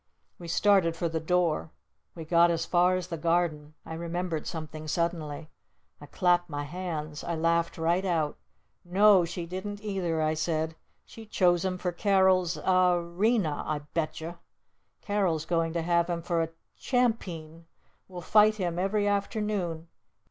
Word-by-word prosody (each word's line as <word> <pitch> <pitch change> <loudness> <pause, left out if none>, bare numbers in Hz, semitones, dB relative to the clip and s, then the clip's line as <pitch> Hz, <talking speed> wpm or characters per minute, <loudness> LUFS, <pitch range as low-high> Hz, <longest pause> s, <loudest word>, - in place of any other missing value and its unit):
We 170 - -8
started 185 -1 +3
for 170 - -1
the 160 0 -2
door. 170 -1 0 0.5
We 165 -2 -7
got 170 +1 +4
as 165 -1 0
far 180 +1 +3
as 180 -1 -4
the 165 -2 -4
Garden. 160 -3 0
I - - -7
remembered 170 -1 -3
something 155 -2 -6
suddenly. 155 -1 -2 0.5
I 145 - -10
clapped 175 +1 +1
my 145 -1 -3
hands. 155 -2 -5
I 170 - -2
laughed 170 +1 +1
right 170 +3 +1
out! 165 -5 0 0.5
"No! 190 0 +5
She 170 +1 -5
didn't 200 +4 -6
either!" 185 -6 -1
I 155 0 +1
said. 160 0 -1 0.3
"She 225 -1 -12
chose 175 -4 +2
him 185 -1 -1
for 180 0 -2
Carol's 185 -2 +2
Ar 185 -1 +3
Rena 175 -1 0
I 150 -1 -2
bet'cher! 160 +1 -3 0.6
Carol's 185 -7 0
going 165 -1 0
to 170 -1 -1
have 170 0 +2
him 170 -1 -2
for 170 -1 0
a 165 - -1 0.3
Cham 245 -3 +2
peen! 165 -5 -10 0.4
We'll 180 -2 -8
fight 215 +4 +5
him 175 -4 -2
every 205 +2 +1
afternoon! 200 -5 -2
170 Hz, 155 wpm, -28 LUFS, 160-185 Hz, 0.6 s, No